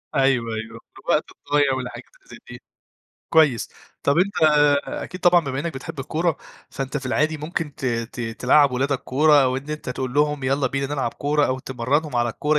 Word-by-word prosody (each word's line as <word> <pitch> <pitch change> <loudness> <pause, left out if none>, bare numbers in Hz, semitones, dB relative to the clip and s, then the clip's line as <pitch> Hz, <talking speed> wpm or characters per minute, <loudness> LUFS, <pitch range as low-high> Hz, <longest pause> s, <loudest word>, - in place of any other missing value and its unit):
أيوه، 125 -4 +2
أيوه، 110 +1 -7 0.2
في - - -13
الوقت - - +3
الضايع 145 -2 +1
والحاجات 130 -1 -5
اللي - - -27
زي - - -11
دي. - - -10 0.7
كويس، 150 -8 +4 0.3
طب 140 - +2
أنت 200 +3 +2 0.5
أكيد 185 - -6
طبعًا 175 -1 +5
بما 135 0 -3
إنّك 170 -2 -4
بتحب 135 +2 -7
الكورة، 160 +4 -1 0.3
فأنت 135 +2 -4
في 135 -2 -4
العادي 155 +4 +1
ممكن 155 -1 -4
ت - - -9
ت 115 0 -3
تلعّب 125 +5 +3
ولادك 135 +1 0
كورة، 145 +2 +4
أو 130 0 +1
إن 140 +3 -6
أنت 150 -3 -5
تقول 125 0 -4
لهم 150 -2 +1
يالّا 135 0 +1
بينا 135 +2 -2
نلعب 140 -1 -2
كورة 145 0 +1
أو 130 0 -1
تمرّنهم 130 +3 -1
على 120 0 +2
الكورة 150 +6 0
135 Hz, 190 wpm, -22 LUFS, 130-150 Hz, 0.7 s, طبعًا